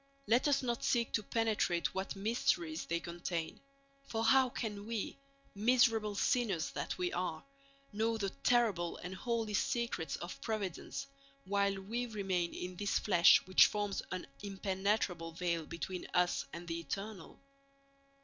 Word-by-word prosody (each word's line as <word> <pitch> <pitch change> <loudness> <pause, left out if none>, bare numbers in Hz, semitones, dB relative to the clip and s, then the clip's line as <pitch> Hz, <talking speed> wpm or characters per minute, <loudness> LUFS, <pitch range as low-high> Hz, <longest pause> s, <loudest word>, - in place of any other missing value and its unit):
Let 235 +6 +3
us 285 -1 +3
not 240 -2 -1
seek 235 -2 +2
to 215 - +1
penetrate 215 -6 0
what 190 +1 -3
mysteries 185 -6 0
they 170 0 0
contain; 170 -1 -4 0.5
for 225 0 -1
how 260 +2 +5
can 210 -4 -4
we, 225 -3 -3 0.4
miserable 225 -1 +3
sinners 220 - +1
that - - -3
we 180 -1 -1
are, 175 -3 -2 0.5
know 225 +2 +1
the 200 -3 -2
terrible 205 -10 +1
and 180 +1 -6
holy 225 +1 -2
secrets 230 -6 0
of 175 - -7
Providence 205 -6 -3 0.4
while 200 0 +1
we 235 +5 -2
remain 190 -6 -1
in 180 0 -5
this 205 +2 +1
flesh 175 -5 +6
which 185 0 +7
forms 205 -1 -2
an 185 -1 -3 0.2
impenetrable 195 -3 -1
veil 170 -2 -1
between 175 +2 -5
us 180 0 +2
and 170 +1 -8
the 165 0 -2
Eternal? 195 +4 -6
200 Hz, 140 wpm, -34 LUFS, 175-225 Hz, 0.5 s, which